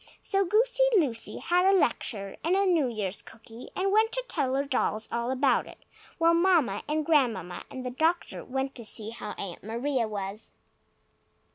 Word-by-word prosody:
So 390 0 +1
Goosey 475 +7 +2 0.2
Lucy 250 -10 0
had 355 +1 +2
a 390 +1 +5
lecture, 200 - -1
and 345 +3 +2
a 395 +1 +3
New 335 -7 +3
Year's 210 -5 -3
cookie, 225 +1 -13
and 390 +1 0
went 440 +2 +4
to - - -1
tell 265 -5 -1
her 275 +1 0
dolls 250 -5 -1
all 235 +1 -1
about 260 0 +2
it, - - -12 0.4
while 335 0 +4
Mamma 335 - +3
and 305 0 0
Grandmamma 245 - +1
and 255 -1 -7
the 250 - -3
doctor 325 +6 0
went 265 +1 -3
to 235 - -8
see 220 0 -4
how 230 -2 -6
Aunt 185 -4 -6
Maria 235 +3 -1
was. 205 0 -6
265 Hz, 175 wpm, -28 LUFS, 225-345 Hz, 0.4 s, a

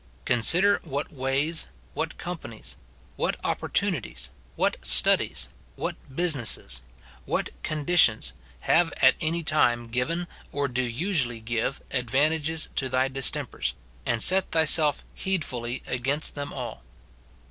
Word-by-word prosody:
Consider 180 - +4
what 145 0 -5
ways, 140 - 0 0.3
what - - -4
companies, 165 -11 -7 0.4
what - - -1
opportunities, - - -2 0.2
what - - -1
studies, 60 - +3 0.3
what - - -4 0.2
businesses, 135 - 0 0.5
what - - -2
conditions, 145 - +2 0.3
have 170 0 +2
at - - +5
any 165 +1 -2
time 120 -7 +1
given, 165 +9 -3 0.2
or 145 0 -2
do 130 0 -2
usually 125 - -1
give, 115 +4 -3
advantages 150 +5 0
to 130 - 0
thy 130 +1 0
dis 135 -1 +5
tempers, 90 - -3 0.3
and 115 -3 +1
set 190 0 +8
thyself 155 -2 +5
heedfully 130 -10 -1
against 135 +5 -1
them 145 -1 -6
all. - - -7
140 Hz, 115 wpm, -25 LUFS, 120-160 Hz, 0.5 s, set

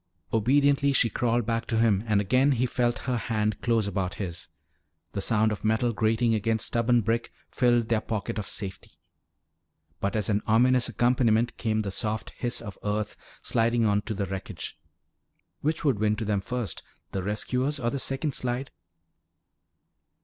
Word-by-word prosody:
Obediently 140 +5 +3
she 115 -4 +4
crawled 120 +2 +1
back 115 +1 -1
to 115 - 0
him 110 -3 +3
and 105 -2 +3
again 130 +8 +3
he 125 0 +1
felt 120 -1 0
her 125 -2 0
hand 110 -3 -1
close 115 -3 +2
about 95 -2 -2
his. 85 -4 -5 0.6
The 100 - -3
sound 110 +1 +2
of 105 - -5
metal 110 +2 +1
grating 115 +2 +2
against 110 +1 +1
stubborn 120 0 +2
brick 115 +2 -1 0.2
filled 120 -2 +2
their 115 -2 +2
pocket 110 0 -3
of 105 - -5
safety. 95 -3 -6 1.1
But 100 +1 -1
as 105 -2 +1
an 105 -1 +1
ominous 125 +3 +4
accompaniment 120 -1 +2
came 110 -1 0
the 100 - -3
soft 110 +3 -1
hiss 120 0 -1
of 105 -3 -8
earth 105 0 -2 0.3
sliding 115 0 +2
onto 105 +1 0
the 100 - -1
wreckage. 95 -2 -6 0.8
Which 155 +2 -1
would 130 -8 +2
win 105 0 +2
to 110 +1 -4
them 100 -2 0
first, 125 +1 -4 0.3
the 95 - -2
rescuers 125 +8 -1
or 120 0 0
the 140 - -2
second 135 +3 0
slide? 125 +2 -2
115 Hz, 165 wpm, -27 LUFS, 105-120 Hz, 1.1 s, she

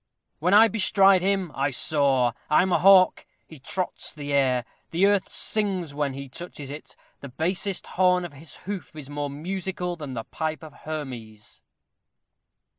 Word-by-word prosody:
When 180 +6 +3
I 220 +2 +8
bestride 195 -2 +4
him, 190 -3 0
I 140 +1 0
soar, 135 -3 +2 0.2
I 150 - +5
am 190 - -1
a - - +3
hawk: 190 -1 +5 0.2
he 160 - -13
trots 185 +7 -3
the 145 -2 -5
air; 130 -3 +2 0.2
the 175 +4 +2
earth 200 -2 +2
sings 190 -8 -1
when 145 -2 -1
he 140 +1 -7
touches 145 -1 -8
it; 135 -3 -10 0.2
the 140 - -9
basest 180 +8 -2
horn 180 -1 +2
of 170 - -9
his 150 +3 -9
hoof 195 -5 -6
is 145 -2 -9
more 145 0 -3
musical 180 +4 -4
than 145 -5 -7
the 115 -2 -4
pipe 155 +4 -4
of 155 -2 -11
Hermes. 125 -10 -8
155 Hz, 165 wpm, -25 LUFS, 140-185 Hz, 0.2 s, I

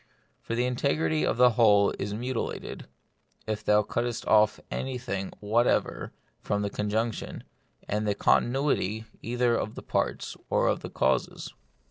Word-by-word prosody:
For 115 - -4
the 120 +1 +1
integrity 80 -10 0
of - - 0
the 125 0 +6
whole 105 -3 +5
is 100 - -3
mutilated, 120 +3 -4 0.6
if 110 -1 -3
thou 105 0 +4
cuttest 120 +2 -2
off 105 0 +4
anything 125 -7 -3
whatever 115 +4 +1 0.3
from 105 0 -1
the 100 - -2
conjunction, 110 +3 -2 0.4
and 105 +1 -1
the 100 - +1
continuity 120 -4 +1 0.2
either 120 0 +1
of 110 - -3
the - - -8
parts - - -2
or - - +2
of - - 0
the - - -7
causes. - - -1
110 Hz, 140 wpm, -28 LUFS, 105-120 Hz, 0.6 s, the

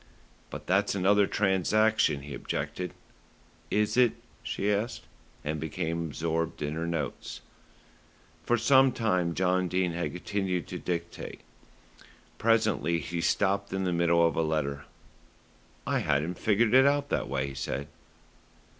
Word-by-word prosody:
"But - - -8
that's 95 +2 +2
another 100 +1 +4
transaction," 100 -4 +2
he 70 0 -7
objected. 90 +5 -4 0.7
"Is 105 0 +1
it?" 125 -3 +5 0.3
she 105 +1 -1
asked, 105 +2 -2 0.4
and 75 +1 -2
became 85 +3 -2
absorbed 80 +1 -2
in 75 +1 -2
her 80 +1 -3
notes. 80 -4 -4 1.0
For 120 - +2
some 135 +1 +5
time 90 -7 0
John 95 0 +1
Dene 90 0 0
had 85 +1 -2
continued 90 -1 -2
to - - -5
dictate. 85 -1 -5 1.0
Presently 110 -7 +2
he 85 0 -4
stopped 100 +2 +1
in 95 0 -1
the 90 -1 0
middle 85 0 +3
of - - -2
a - - +2
letter. 75 -3 -1 1.0
"I - - +1
hadn't 80 +6 0
figured 110 +1 +2
it 130 +1 +7
out 145 0 +1
that - - -1
way," 70 0 -1
he - - -8
said. 70 +1 -4
90 Hz, 135 wpm, -28 LUFS, 80-105 Hz, 1.0 s, it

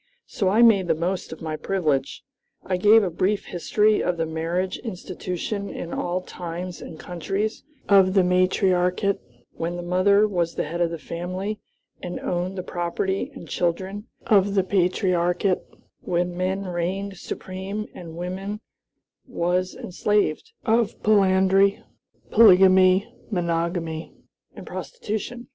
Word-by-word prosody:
So 195 -4 -1
I 220 +5 +5
made 200 -6 +5
the 165 - +2
most 180 +3 -2
of 160 - -8
my 155 -1 -3
privilege. 155 -7 -1 0.4
I 185 - 0
gave 210 +4 +6
a 185 - -1
brief 195 +5 0
history 210 +4 +2
of 180 -1 0
the 165 - 0
marriage 170 +4 -2
institution 195 0 -5
in 170 - -6
all 180 +1 -1
times 175 0 -6
and 160 - -9
countries, 195 +5 -3 0.2
of 195 -1 +5
the 190 - +5
matriarchate, 180 +1 +2 0.3
when 170 +1 -3
the 175 - -5
mother 200 +4 +4
was 175 -4 -1
the - - 0
head 170 +3 -4
of 170 - +2
the 165 - -4
family 185 +6 -4 0.4
and 180 0 -5
owned 180 +2 -2
the 185 - -3
property 175 +3 -2
and 165 - -10
children; 190 +5 -2 0.2
of 200 -2 +3
the 195 - +3
patriarchate, 180 -1 +1 0.4
when 175 0 -1
man 185 +2 -1
reigned 190 +2 -3
supreme 190 +5 -5
and 165 -2 -9
woman 190 +4 -4 0.7
was 180 -5 -1
enslaved; 205 - -1
of 225 -1 +1
polyandry, 195 -1 +4 0.5
polygamy, 190 -2 +6 0.2
monogamy, 170 -3 -2 0.4
and - - -9
prostitution. 240 - -5
185 Hz, 135 wpm, -24 LUFS, 175-200 Hz, 0.7 s, gave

